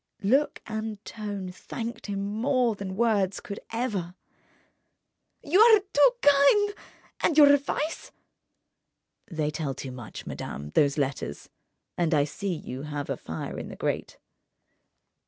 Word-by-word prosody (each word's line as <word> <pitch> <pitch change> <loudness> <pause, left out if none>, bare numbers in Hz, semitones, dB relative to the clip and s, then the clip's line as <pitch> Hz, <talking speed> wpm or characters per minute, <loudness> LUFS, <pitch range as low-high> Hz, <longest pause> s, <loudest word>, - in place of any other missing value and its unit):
Look 270 +9 +2
and 220 -1 -4
tone 205 -4 -5
thanked 230 +6 -6
him 200 -1 -2
more 240 +3 +1
than 195 -2 -6
words 205 -4 +1
could 200 - -7
ever. 210 -7 -2 1.3
"You 345 +7 +3
are 440 -1 +8
too 385 -3 +4
kind! 290 +9 +5 0.5
And 315 - +1
your 290 -2 +9
advice—?" 285 +3 -1 1.2
"They 155 -4 -1
tell 145 -3 -3
too 130 - -6
much, 120 -3 -9
madame, 75 +2 -6
those 140 - +3
letters. 135 - -3 0.5
And 170 -2 +2
I 145 - +4
see 190 +7 -4
you 135 -6 -5
have 145 -1 -4
a - - 0
fire 80 -8 -6
in - - -6
the - - -8
grate - - -3
205 Hz, 135 wpm, -27 LUFS, -, 1.3 s, your